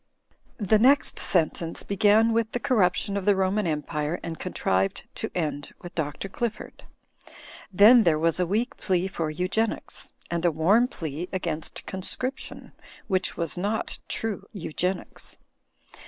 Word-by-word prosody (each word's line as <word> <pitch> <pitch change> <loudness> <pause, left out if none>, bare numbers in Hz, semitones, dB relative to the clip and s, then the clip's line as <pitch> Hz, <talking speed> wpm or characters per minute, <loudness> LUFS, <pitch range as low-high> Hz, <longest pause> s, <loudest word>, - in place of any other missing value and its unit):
The 215 0 +3
next 275 +5 +4
sentence 165 -1 0
began 215 +3 +4
with 225 -1 0
the 245 - -1
corruption 200 -4 +1
of 200 -2 -2
the 205 -1 +5
Roman 190 +1 +1
Empire 150 +1 -2
and 165 -1 -5
contrived 95 - 0
to - - -4
end 150 -4 -3
with 175 0 -8
Dr. 155 +3 -3
Qifford. 220 +2 -5 0.9
Then 215 +6 +8
there 165 -7 +3
was 165 +2 +1
a 180 - +1
weak 220 +7 -1
plea 185 -1 0
for 165 -4 -3
Eugenics; 185 +8 -2 0.2
and 170 0 -1
a 175 - +5
warm 195 +11 +4
plea 165 - -5
against 170 -4 -4
Conscription, 225 +8 -4 0.4
which 185 -3 0
was 170 +1 -1
not 205 +4 -2
True 205 -3 -2
Eugenics. 180 0 -4
185 Hz, 140 wpm, -26 LUFS, 165-215 Hz, 0.9 s, Then